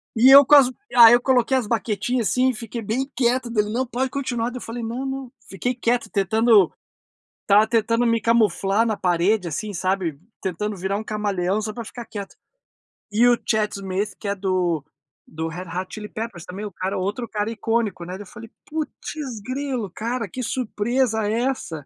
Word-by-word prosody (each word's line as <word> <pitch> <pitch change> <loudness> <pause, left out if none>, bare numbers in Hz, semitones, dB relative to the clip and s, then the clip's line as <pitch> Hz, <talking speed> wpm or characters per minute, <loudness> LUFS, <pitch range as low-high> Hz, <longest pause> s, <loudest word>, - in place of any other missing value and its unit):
E 240 +3 +6
eu 280 +1 +10
com 295 - +7
as 275 -3 +7 0.3
aí 235 -1 +10
eu 240 - +5
coloquei 260 0 +2
as 235 -5 -2
baquetinha, 230 +2 -1
assim, 250 +6 +2
e - - 0
fiquei 230 +1 -6
bem 245 +6 -2
quieto, 245 0 +1
daí 215 -2 +2
ele: 210 - -5
"Não, 255 +2 0
pode 255 +2 -2
continuar", 245 -4 -2
daí 250 - -6
eu - - -8
falei: 230 +1 -6
"Não 235 +4 -4
não", 265 -2 -5 0.2
fiquei 245 +6 -2
quieto 240 0 0
tentando, 215 0 +4 0.7
estava 210 +1 +4
tentando 230 +1 +1
me 230 -1 +2
camuflar 220 -1 +2
na 220 - 0
parede 180 +2 +1
assim 205 +7 -4
sabe, 185 -4 -1 0.2
tentando 205 +3 -3
virar 190 +2 -2
um 215 - -4
camaleão 205 -2 -1
só 215 0 -4
para 235 - -6
ficar 235 +2 -9
quieto. 200 -3 -8 0.8
E 220 +3 +4
o 240 -1 +5
Chad 215 -2 +1
Smith 195 +1 -3
que 205 - -6
é 200 - 0
do 180 -5 0 0.4
do 160 +1 -5
Red 175 +3 -7
Hot 185 +1 -3
Chili 210 -1 -7
Peppers 215 -6 -6
também 195 +4 -7
o 205 - -6
cara 190 +3 -3
outro 205 +6 -3
cara 210 0 -2
icônico, 225 -4 -1
né, 180 +1 -7
daí 195 - -7
eu 195 - -17
falei: 230 0 -11 0.2
"Putz 300 -4 -5
grilo 255 -2 -3
cara, 230 +4 -3
que 255 +8 -6
surpresa 235 -1 0
é 205 - 0
essa?". 170 - -3
220 Hz, 200 wpm, -23 LUFS, 200-245 Hz, 0.8 s, eu